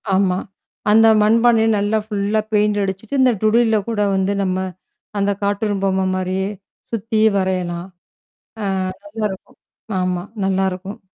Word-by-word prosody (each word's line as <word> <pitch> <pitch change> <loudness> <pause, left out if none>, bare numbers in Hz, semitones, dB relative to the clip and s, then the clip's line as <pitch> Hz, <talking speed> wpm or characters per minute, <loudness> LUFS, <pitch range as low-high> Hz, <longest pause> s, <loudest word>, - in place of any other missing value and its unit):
ஆமா. 190 -2 +2 0.5
அந்த 225 +1 +6
மண்பானைய 225 +1 +4
நல்லா 205 +2 +1
ஃபுல்லா 210 0 0
பெயிண்ட்டு 210 -1 +2
அடிச்சிட்டு, 195 +8 -3
இந்த 255 -1 +5
டுடியில்ல 220 +1 +3
கூட 220 -2 -1
வந்து, 190 +1 +1
நம்ம 185 -1 0 0.6
அந்த 200 0 +2
கார்ட்டூன் 205 0 0
பொம்ம 190 0 +1
மாரியே, 185 +1 -1 0.4
சுத்தீ 225 0 -1 0.2
வரையலாம். 180 -2 -1 0.8
ஆ, - - -1 0.4
நல்லா 215 +1 -4
இருக்கும் 190 - -11 0.4
ஆமா 180 -1 -1 0.2
நல்லாருக்கும். 190 +2 -1
200 Hz, 125 wpm, -19 LUFS, 190-220 Hz, 0.8 s, அந்த